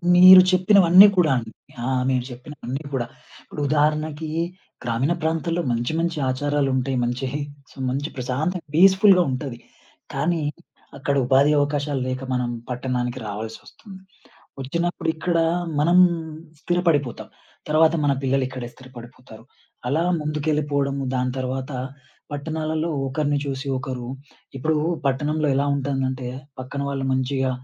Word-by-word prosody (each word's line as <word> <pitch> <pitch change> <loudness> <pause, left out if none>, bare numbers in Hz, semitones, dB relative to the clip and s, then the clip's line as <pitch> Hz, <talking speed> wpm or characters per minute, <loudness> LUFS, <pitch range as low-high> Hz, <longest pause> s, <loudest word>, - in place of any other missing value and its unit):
మీరు 185 +1 +10
చెప్పినవన్నీ 185 0 +7
కూడా 165 -5 +4
అండి. 115 -2 -5 0.3
ఆ! - - -2 0.2
మీరు 130 -2 +1
చెప్పినవన్నీ 130 +2 -7
గూడా. 120 -3 -1 0.4
ఇప్పుడు 150 - -7
ఉదాహరణకి 155 +1 0 0.5
గ్రామీణ 120 +7 0
ప్రాంతాల్లో, 165 +2 -1
మంచి 120 +4 -1
మంచి 170 -1 -1
ఆచారాలుంటాయి. 135 -1 0
మంచి 125 +3 -2
హి 145 - -2 0.5
మంచి 140 +4 -2
ప్రశాంతంగా 145 +7 -3
పీస్‌ఫుల్‌గా 190 +1 +6
ఉంటది. 130 -2 -5 0.5
కానీ, 160 +4 0 0.6
అక్కడ 140 +1 -1
ఉపాధి 135 +3 +4
అవకాశాలు 145 -1 -1
లేక, 130 0 -3
మనం 125 -1 -1 0.2
పట్టణానికి 125 0 -2
రావాల్సొస్తుంది. 110 - -9 0.6
ఒచ్చినప్పుడు 170 +5 -2
ఇక్కడ 170 +1 -1 0.4
మనం 175 +4 +4 0.6
స్థిరపడిపోతాం. 165 -8 0 0.4
తర్వాత 160 +1 +4
మన 140 - +3
పిల్లలిక్కడే 130 -2 -1
స్థిరపడిపోతారు. 125 -3 -13 0.4
అలా 155 +6 +1 0.2
ముందుకెళ్లిపోడము, 145 -2 -1
దాని 125 0 0
తర్వాత 130 +2 -3 0.6
పట్టణాలల్లో 155 +2 -2 0.2
ఒకరిని 145 +2 0
చూసి 135 0 -4
ఒకరు 130 -2 -5 0.5
ఇప్పుడు 155 +4 0 0.3
పట్టణంలో 150 +3 0
ఎలా 140 +1 +1
ఉంటందంటే, 130 -2 -2 0.3
పక్కన 130 +2 -5
వాళ్ళు 135 -1 -3
మంచిగా 130 0 0
140 Hz, 115 wpm, -23 LUFS, 130-160 Hz, 0.6 s, మీరు